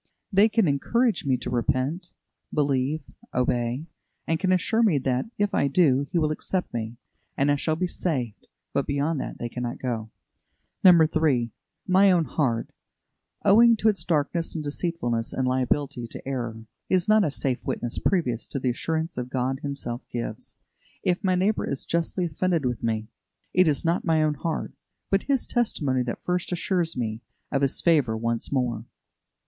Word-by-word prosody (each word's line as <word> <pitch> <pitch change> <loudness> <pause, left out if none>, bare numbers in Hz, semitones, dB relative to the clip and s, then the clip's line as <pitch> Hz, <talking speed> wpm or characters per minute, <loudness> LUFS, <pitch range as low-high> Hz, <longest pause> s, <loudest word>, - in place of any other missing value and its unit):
They 200 +3 +6
can 220 -4 +2
encourage 225 - +1
me 130 -2 +2
to 125 - -5
repent, 130 +8 -1 0.4
believe, 140 +1 +1 0.3
obey, 125 +2 0 0.4
and 165 -1 0
can 185 -1 +1
assure 200 +5 +2
me 205 -10 +4
that, 130 - 0
if 205 -1 0
I - - +2
do, 140 -2 +3
He - - 0
will 155 -2 +2
accept 180 +4 -3
me, 115 0 -4 0.4
and 140 +1 +3
I - - +4
shall 155 +2 0
be 180 - -1
saved; 130 - -3 0.3
but 140 - 0
beyond 145 +2 0
that - - -6
they 120 - -3
cannot 120 +1 -4
go. 115 -4 -3 0.7
3. 155 - +5 0.3
My 195 +2 +5
own 170 -3 +3
heart, 120 -8 -1 0.7
owing 230 +4 +7
to 220 0 +3
its 195 -6 +1
darkness 165 +1 0
and 155 - -3
deceitfulness 145 -7 -2
and 130 -1 0
liability 130 -1 0
to 115 - -9
error, 115 -4 -4 0.2
is 185 -2 +2
not 215 0 +5
a 155 - +1
safe 135 -2 -2
witness 120 -1 -3
previous 125 - 0
to 140 - -4
the 125 -1 +1
assurance 160 +4 -2
God 130 +1 -1
Himself 140 -4 -4
gives. 115 -2 -5 0.5
If 180 +2 +1
my 185 -1 +2
neighbour 195 +4 +1
is 140 - -3
justly 170 +2 -1
offended 170 -1 0
with 125 -2 -2
me, 110 -1 -1 0.4
it 185 -1 +5
is 145 -1 +1
not 170 +2 +1
my 160 -2 +2
own 155 -1 +2
heart, 160 +2 -3 0.4
but 195 0 +1
his 270 -3 +2
testimony 145 - +1
that 120 -1 -4
first 180 0 -1
assures 175 -2 -1
me 110 -2 -2 0.3
of 140 - +1
his 135 -1 +1
favour 145 -10 +3
once 115 0 -2
more. 120 -5 -1
145 Hz, 170 wpm, -25 LUFS, 125-175 Hz, 0.7 s, owing